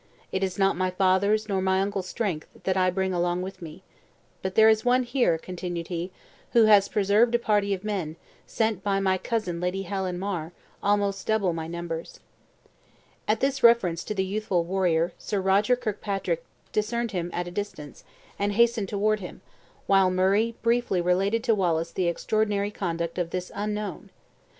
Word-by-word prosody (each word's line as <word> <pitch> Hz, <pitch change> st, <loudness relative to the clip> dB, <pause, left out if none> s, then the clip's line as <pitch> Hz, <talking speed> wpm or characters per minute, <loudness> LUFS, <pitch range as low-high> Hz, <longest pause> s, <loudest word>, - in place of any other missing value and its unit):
It 190 Hz, -, -1 dB
is 185 Hz, -2 st, -2 dB
not 195 Hz, -1 st, +3 dB
my 185 Hz, +1 st, 0 dB
father's 195 Hz, +3 st, +2 dB
nor 195 Hz, -3 st, 0 dB
my 190 Hz, 0 st, +2 dB
uncle's 195 Hz, -1 st, -2 dB
strength, 185 Hz, -8 st, -3 dB, 0.2 s
that 190 Hz, -, 0 dB
I 185 Hz, -1 st, +3 dB
bring 190 Hz, 0 st, -1 dB
along 175 Hz, +1 st, 0 dB
with 190 Hz, 0 st, -8 dB
me. 165 Hz, +2 st, -10 dB, 0.6 s
But 190 Hz, 0 st, -4 dB
there 220 Hz, 0 st, +7 dB
is 220 Hz, 0 st, +4 dB
one 250 Hz, +1 st, +3 dB
here," 240 Hz, -9 st, +1 dB
continued 175 Hz, -1 st, -6 dB
he, 175 Hz, 0 st, -3 dB, 0.4 s
"who 235 Hz, -, +6 dB
has 210 Hz, -2 st, +6 dB
preserved 210 Hz, +4 st, +3 dB
a -, -, +6 dB
party 210 Hz, -3 st, +1 dB
of 190 Hz, -, -11 dB
men, 190 Hz, -7 st, -3 dB, 0.3 s
sent 220 Hz, -4 st, 0 dB
by 195 Hz, -1 st, +1 dB
my 190 Hz, -1 st, +1 dB
cousin 185 Hz, -7 st, -2 dB
Lady 180 Hz, +2 st, -1 dB
Helen 190 Hz, -1 st, -3 dB
Mar, 180 Hz, -4 st, -4 dB, 0.3 s
almost 200 Hz, -1 st, 0 dB
double 205 Hz, -5 st, +2 dB
my 160 Hz, -1 st, -4 dB
numbers." 170 Hz, -1 st, -6 dB, 1.1 s
At 215 Hz, +1 st, +1 dB
this 275 Hz, 0 st, 0 dB
reference 195 Hz, -8 st, +4 dB
to 210 Hz, -, -4 dB
the 190 Hz, -1 st, 0 dB
youthful 195 Hz, -3 st, -1 dB
warrior, 175 Hz, -2 st, +1 dB
Sir 205 Hz, -, -2 dB
Roger 195 Hz, +6 st, +3 dB
Kirkpatrick 215 Hz, -, -3 dB, 0.3 s
discerned 230 Hz, +2 st, -1 dB
him 175 Hz, -3 st, -2 dB
at 175 Hz, +1 st, -3 dB
a -, -, -6 dB
distance, 175 Hz, -7 st, -6 dB, 0.4 s
and 205 Hz, 0 st, 0 dB
hastened 235 Hz, -2 st, +2 dB
toward 215 Hz, +1 st, +1 dB
him, 180 Hz, -1 st, -9 dB, 0.4 s
while 195 Hz, -1 st, +4 dB
Murray 195 Hz, +5 st, +2 dB
briefly 235 Hz, -5 st, +2 dB
related 195 Hz, +6 st, +1 dB
to 235 Hz, -3 st, +3 dB
Wallace 170 Hz, -5 st, 0 dB
the 185 Hz, -2 st, -1 dB
extraordinary 205 Hz, +3 st, 0 dB
conduct 170 Hz, -3 st, -3 dB
of 175 Hz, -1 st, -1 dB
this 180 Hz, +1 st, -4 dB
unknown. 210 Hz, -2 st, -4 dB
195 Hz, 175 wpm, -26 LUFS, 180-215 Hz, 1.1 s, there